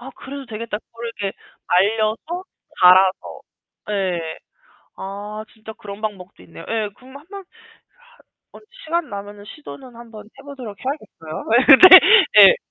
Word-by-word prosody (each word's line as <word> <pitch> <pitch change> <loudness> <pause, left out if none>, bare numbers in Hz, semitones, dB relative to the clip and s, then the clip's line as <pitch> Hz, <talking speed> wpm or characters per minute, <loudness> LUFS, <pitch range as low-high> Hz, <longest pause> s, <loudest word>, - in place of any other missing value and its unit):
아 255 +2 -11
그래도 275 -1 -10
되겠다. 220 -1 -6
그걸 230 +1 -12
이렇게 195 -1 -4 0.3
말려서 220 - -1 0.4
갈아서 185 +1 +3 0.5
예. 180 -5 -4 0.6
아 205 +2 -8
진짜 220 0 -12
그런 205 -1 -12
방법도 200 -4 -8
있네요. - - -14
예. 220 -2 -2
그럼 260 +2 -15
한번 385 +7 -12 1.1
한번 - - -17 0.2
시간 330 -1 -3
나면은 205 0 -9
시도는 265 -5 -13
한번 225 -3 -13
해 215 - -19
보도록 255 -8 -10
해야겠어요. 215 - -8 0.3
예 270 - +11
네. 370 - +8
예. - - +4
215 Hz, 280 characters per minute, -19 LUFS, 200-265 Hz, 1.1 s, 예